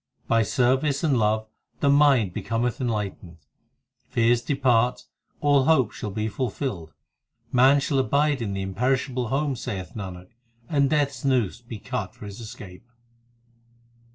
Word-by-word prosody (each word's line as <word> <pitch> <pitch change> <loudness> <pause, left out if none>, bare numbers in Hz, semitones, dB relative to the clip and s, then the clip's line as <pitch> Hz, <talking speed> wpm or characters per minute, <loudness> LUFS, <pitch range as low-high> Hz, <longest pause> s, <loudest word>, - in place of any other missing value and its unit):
By 115 -1 +3
service 130 - +1
and 150 -5 +3
love 110 0 +1 0.3
the - - +1
mind 140 -9 +4
becometh 115 +6 -2
enlightened, 105 -7 -3 0.7
Fears 115 0 +2
depart, 125 -3 +1 0.4
all 145 -2 +4
hopes 135 -8 +3
shall 105 - -5
be 110 +2 -2
fulfilled, 105 - -4 0.6
Man 130 +3 +5
shall 140 0 0
abide 140 +1 +1
in 100 -3 -2
the 95 0 -3
imperishable 125 +5 -1
home, 140 +3 0
Saith 100 -7 -5
Nanak, 95 -4 -7 0.4
and 140 -3 +2
Death 150 -2 +2
s 140 - -11
noose 125 -6 +1
be 115 -2 -8
cut 100 -2 -5
for - - -11
his 100 +1 -9
escape. 105 -2 -10
120 Hz, 140 wpm, -25 LUFS, 105-135 Hz, 0.7 s, Man